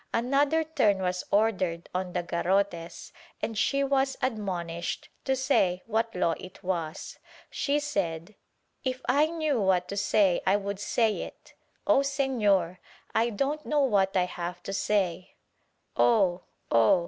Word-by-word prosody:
Another 280 +6 +2
turn 270 -11 +2
was 180 0 -1
ordered 185 -5 +1
on 180 -1 -3
the 180 - -1
garrotes 175 0 -1 0.3
and 225 - -3
she 275 +6 +1
was 270 -1 +1
admonished 180 -8 -3 0.2
to 265 - +2
say 190 -9 +1
what 225 0 -1
Law 170 -2 +2
it 185 +2 -11
was. 170 -4 -4 0.3
She 290 +1 0
said 195 - -3 0.5
"If 260 -1 -3
I 290 +4 +4
knew 310 -7 0
what 185 -2 +2
to 200 - -4
say 200 -2 +3
I 190 - +3
would 200 -1 -3
say 220 +1 +1
it. - - -10 0.3
Oh 275 - +5
Senor, 225 -11 +1 0.3
I 230 +1 +2
don't 275 +7 -2
know 300 -1 +1
what 195 -7 +2
I 180 - +3
have 175 0 -6
to 195 - -5
say 185 -4 -1 0.3
— - - -47
Oh 190 -6 +3 0.3
I - - +2
Oh 115 +10 +5
200 Hz, 150 wpm, -28 LUFS, 180-265 Hz, 0.5 s, Oh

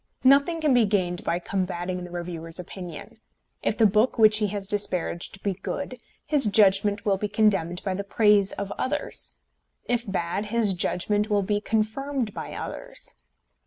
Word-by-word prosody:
Nothing 280 +5 +5
can 300 -3 +3
be 245 -3 +5
gained 180 -4 0
by 170 - 0
combating 180 0 -3
the 175 - -8
reviewer's 170 -1 -5
opinion. 180 +4 -8 0.4
If 215 - -1
the 225 - +5
book 215 +6 +3
which 215 -1 +6
he 210 - +2
has 200 0 -4
disparaged 195 -2 -2
be 200 - 0
good, 255 +8 -5 0.3
his 290 -4 +2
judgment 205 0 +4
will 200 -2 +2
be 210 - -2
condemned 195 -5 +1
by 190 - -1
the 200 +2 -3
praise 205 -1 +3
of 200 0 -5
others; 290 +3 -3 0.5
if 240 -4 -1
bad, 185 +2 -1
his 220 -2 +2
judgment 205 +4 0
will 205 -1 +2
be 205 +1 0
confirmed 225 +2 -1
by - - -6
others. - - -6
205 Hz, 160 wpm, -25 LUFS, 185-220 Hz, 0.5 s, which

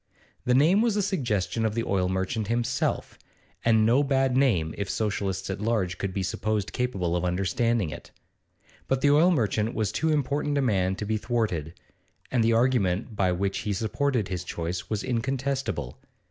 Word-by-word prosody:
The 125 - +3
name 165 +10 +5
was 230 -3 +2
a 205 - +1
suggestion 120 - -1
of 110 -1 0
the 115 - 0
oil 95 -3 0
merchant 95 +3 -1
himself, 120 +1 -1 0.4
and 110 -1 +4
no 120 +5 +4
bad 135 -2 +1
name 100 -13 +2
if 100 -1 -4
Socialists 100 -3 -2
at 95 - -5
large 105 -6 0
could 100 - -2
be 95 0 -2
supposed 105 +2 -2
capable 95 -9 -1
of 90 - -1
understanding 100 - 0
it; - - -9 0.8
but 135 -1 0
the 145 - +4
oil 155 +5 +5
merchant 110 - 0
was 110 -3 0
too 160 - 0
important 145 0 0
a - - +2
man 95 -5 +1
to 105 - -5
be 110 +1 0
thwarted, 95 - -2 0.5
and 125 -3 +2
the 115 +1 +3
argument 115 -4 +1
by 95 -2 +2
which 95 +2 -1
he 105 - -2
supported 115 +2 0
his 90 -3 -4
choice 85 +1 -4
was 105 -2 -2
incontestable. 130 - -2
110 Hz, 175 wpm, -26 LUFS, 95-130 Hz, 0.8 s, name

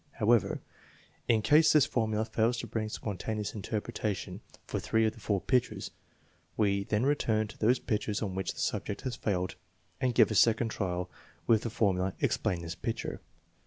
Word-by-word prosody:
However, 115 -2 +2 0.7
in 110 -2 +3
case, 150 +8 +6
this 150 -3 +6
formula 110 -2 0
fails 115 +2 +1
to - - -4
bring 110 -1 -3
spontaneous 105 0 -4
interpretation 105 -1 -3 0.2
for - - -3
three 110 0 +2
of 110 - +1
the 115 - -15
four 100 -2 0
pictures, 125 +4 0 0.7
we 100 -2 +2
then 105 +4 +1
return 110 -7 +1
to - - -12
those 120 +4 +4
pictures 105 -3 -2
on 100 -3 -3
which 95 -1 -2
the - - -9
subject 105 - -2
has 130 -3 -3
failed 95 -3 -2 0.4
and 125 -3 +1
give 115 -2 +5
a - - +1
second 110 +4 +4
trial 90 -4 -2 0.4
with 110 -2 +4
the 115 - -3
for 105 -3 +2
mula: 90 +1 -2
" - - -32
Explain 85 -2 0
this 85 0 -4
picture. - - -4
110 Hz, 180 wpm, -30 LUFS, 100-115 Hz, 0.7 s, case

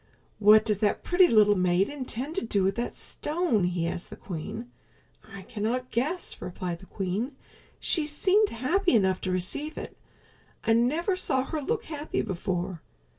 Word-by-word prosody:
"What 215 +1 +7
does 210 -3 0
that 210 -1 +1
pretty 355 +1 +5
little 210 -5 +5
maid 180 +1 +2
intend 275 0 -4
to - - 0
do 200 -3 +2
with 195 +1 +2
that 235 +3 -4
stone?" 300 - 0
he 175 -1 -1
asked 170 - -4
the - - -8
queen. 210 +7 -7 0.6
"I 195 -1 -9
cannot 235 +5 -3
guess," 305 +10 -1
replied 175 -1 -4
the 190 - -15
queen. 205 +8 -3 0.4
"She 315 -4 +2
seemed 390 +8 +3
happy 315 - +1
enough 190 -4 +2
to 185 - -2
receive 190 - -2
it. - - -7 0.7
I 225 - +3
never 300 - +2
saw 265 -7 +1
her 310 +2 -4
look 440 +11 -1
happy 300 -1 -3
before. 180 -1 -3
230 Hz, 165 wpm, -27 LUFS, 190-295 Hz, 0.7 s, What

